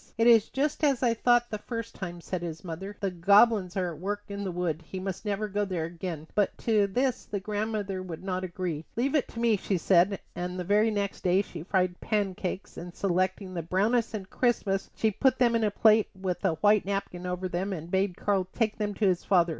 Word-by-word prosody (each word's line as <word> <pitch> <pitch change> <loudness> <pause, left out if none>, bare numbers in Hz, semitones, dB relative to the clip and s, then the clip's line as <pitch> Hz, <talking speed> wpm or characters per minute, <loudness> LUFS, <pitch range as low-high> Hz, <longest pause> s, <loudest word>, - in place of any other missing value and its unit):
"It 225 - +3
is 230 -3 +6
just 295 +3 -1
as 275 -4 +3
I 235 -2 +4
thought 240 +1 +3
the 215 - -3
first 230 0 -5
time," 175 -2 -6
said 180 +1 -4
his 165 -2 -6
mother. 190 +4 -6
"The 195 -2 -1
goblins 200 +1 +4
are 180 -2 -1
at 155 - -11
work 205 +3 -3
in 200 0 -4
the 190 - -2
wood. 170 -2 -2
He 185 +4 -7
must 190 +2 -5
never 205 +1 -1
go 205 0 -1
there 180 -5 -2
again." 165 -2 -6
But 205 -2 +1
to 215 -3 +3
this 250 +5 0
the 205 - -3
grandmother 205 -1 -2
would 180 -2 -7
not 185 -1 -2
agree. 175 -3 -3
"Leave 260 +4 0
it 300 - +2
to 230 - -8
me," 230 -2 +3
she 195 0 -1
said, 180 +2 +3 0.2
and 180 +1 -4
the - - -2
very 210 +4 +3
next 200 -2 -2
day 185 +2 +3
she 170 -5 -9
fried 180 0 0
pancakes, 195 -3 -2
and 175 0 -8
selecting 185 0 -1
the 170 - -2
brownest 215 +7 +1
and 195 -3 -5
crispest 200 -5 0
she 220 - +1
put 260 +5 +2
them 240 -2 +3
in 230 - +2
a 215 - +3
plate 215 +1 +4
with 185 -1 -3
a 190 -4 +2
white 205 +5 +4
napkin 190 -2 -3
over 180 +1 -2
them 185 +3 -2
and 170 -2 -6
bade 190 -1 +1
Karl 195 -3 0
take 220 -2 0
them 205 -1 -1
to 215 - +1
his 185 -3 +2
father. 175 -3 +3
195 Hz, 225 wpm, -28 LUFS, 180-215 Hz, 0.2 s, is